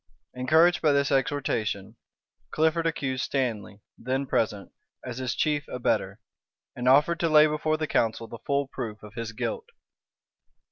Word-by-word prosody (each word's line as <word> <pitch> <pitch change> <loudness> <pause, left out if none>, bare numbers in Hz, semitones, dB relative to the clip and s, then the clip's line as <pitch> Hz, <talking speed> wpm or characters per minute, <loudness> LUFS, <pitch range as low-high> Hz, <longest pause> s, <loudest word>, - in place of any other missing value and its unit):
Encouraged 160 +8 +3
by 150 -3 +3
this 140 0 +1
exhortation, 110 -7 -1 0.5
Clifford 160 +1 +1
accused 130 -5 -2
Stanley, 110 -6 -3 0.2
then 130 +3 -2
present, 105 -5 -1 0.3
as 125 0 -5
his 130 -3 -2
chief 150 -2 0
abettor; 125 - -1 0.6
and 125 +1 0
offered 150 +5 +4
to 165 - +1
lay 155 0 +7
before 155 +1 0
the 155 - -1
council 115 -5 0
the 115 - -9
full 140 +3 -1
proof 115 -6 -6
of 105 -1 -11
his 115 -2 -5
guilt. 455 - -4
135 Hz, 145 wpm, -26 LUFS, 115-155 Hz, 0.6 s, lay